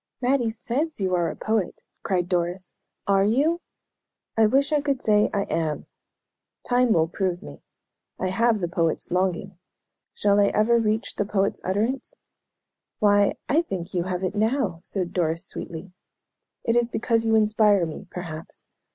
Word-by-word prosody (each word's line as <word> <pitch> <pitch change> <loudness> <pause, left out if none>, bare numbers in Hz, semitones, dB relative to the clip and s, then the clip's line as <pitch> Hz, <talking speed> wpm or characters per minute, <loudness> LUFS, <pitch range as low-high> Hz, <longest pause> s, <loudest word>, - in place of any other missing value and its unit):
"Mattie 250 -2 +2
says 255 +7 -3
you 190 -2 0
are 175 -2 +2
a - - -6
poet!" 215 -4 -2 0.2
cried 180 -2 0
Doris. 175 0 -2 0.3
"Are 195 -1 +3
you?" 290 - +2 0.7
"I 225 -1 +5
wish 275 +6 +2
I 295 - +3
could 280 -2 0
say 210 -2 +3
'I 200 -1 0
am.' 160 -5 -2 0.8
Time 245 -1 +3
will 160 -5 +3
prove 180 0 -2
me. 70 0 -11 0.6
I 185 - 0
have 225 +2 +2
the 175 - 0
poet's 165 -2 -1
longing. 185 0 -1 0.6
Shall 205 0 +3
I 200 - +5
ever 230 +4 +3
reach 220 0 -1
the 205 - 0
poet's 200 -1 0
utterance?" 225 - -1 0.8
"Why, 205 -1 +3
I 310 +4 +3
think 190 - -6
you 175 -1 0
have 185 0 -3
it 185 0 -1
now," 215 -4 0
said 185 -2 -3
Doris, 165 0 0
sweetly. 175 0 -7 0.7
"It 230 - +1
is 240 -1 +2
because 230 -1 0
you 225 0 +2
inspire 210 -3 +4
me, 160 - -8
perhaps. 165 -3 -7
205 Hz, 160 wpm, -25 LUFS, 180-230 Hz, 0.8 s, I